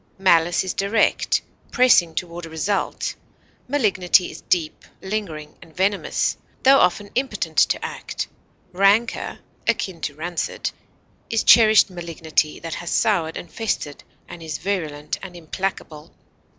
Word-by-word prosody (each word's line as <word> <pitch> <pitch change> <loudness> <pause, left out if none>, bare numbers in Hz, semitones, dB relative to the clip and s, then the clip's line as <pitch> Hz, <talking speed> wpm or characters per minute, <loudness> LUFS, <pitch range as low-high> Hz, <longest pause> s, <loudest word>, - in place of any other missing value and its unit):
Malice 175 -2 +3
is 185 - -3
direct, 200 +2 +1 0.3
pressing 185 -10 +4
toward 170 0 -5
a - - -11
result; 160 +6 -2 0.5
malignity 200 -9 +2
is - - -11
deep, 165 -4 -1 0.2
lingering, 175 -7 -5
and 160 - -17
venomous, 195 +2 0 0.3
tho 270 +1 +7
often 200 +3 +1
impotent 260 +2 -2
to - - +3
act; - - -5 0.4
rancor 200 +5 +2 0.3
(akin 180 -4 -1
to 145 - -3
rancid) 170 +3 -3 0.6
is 225 - +1
cherished 220 -4 +7
malignity 165 -3 -2
that 165 -1 -6
has 175 - -5
soured 175 -8 +1
and - - -9
festered 180 -10 -3 0.2
and 175 - -10
is 160 -1 -4
virulent 155 -6 -3
and 185 -2 -9
implacable. 165 -2 -5
180 Hz, 125 wpm, -22 LUFS, 165-205 Hz, 0.6 s, tho